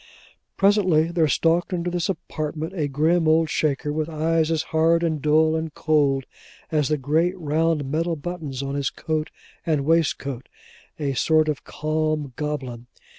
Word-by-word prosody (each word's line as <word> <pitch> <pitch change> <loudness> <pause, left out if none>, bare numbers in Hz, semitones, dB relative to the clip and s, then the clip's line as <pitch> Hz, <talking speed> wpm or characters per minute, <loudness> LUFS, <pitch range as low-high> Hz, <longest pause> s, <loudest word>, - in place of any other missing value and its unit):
Presently, 185 -5 +3
there 165 -2 +2
stalked 165 +5 +1
into 175 0 -2
this 175 +2 -1
apartment, 155 -1 -4
a 155 -6 -1
grim 160 +4 +2
old 160 0 +3
Shaker, 150 0 0
with 155 +1 -2
eyes 160 0 +1
as 160 -1 0
hard, 165 +1 +3
and 160 -3 -1
dull, 155 +2 +3
and 160 0 -3
cold, 140 -4 +2 0.5
as 150 -3 +2
the 150 - +1
great 160 +7 +1
round 160 -1 0
metal 165 +5 -1
buttons 150 -4 -5
on 140 0 -3
his 140 -1 -1
coat 155 -1 -3 0.3
and 150 -4 0
waistcoat; 140 -5 0 0.5
a 140 -3 -1
sort 155 +4 +3
of 145 -2 -3
calm 155 -2 -2
goblin. 130 -5 -4
155 Hz, 155 wpm, -23 LUFS, 145-165 Hz, 0.5 s, Presently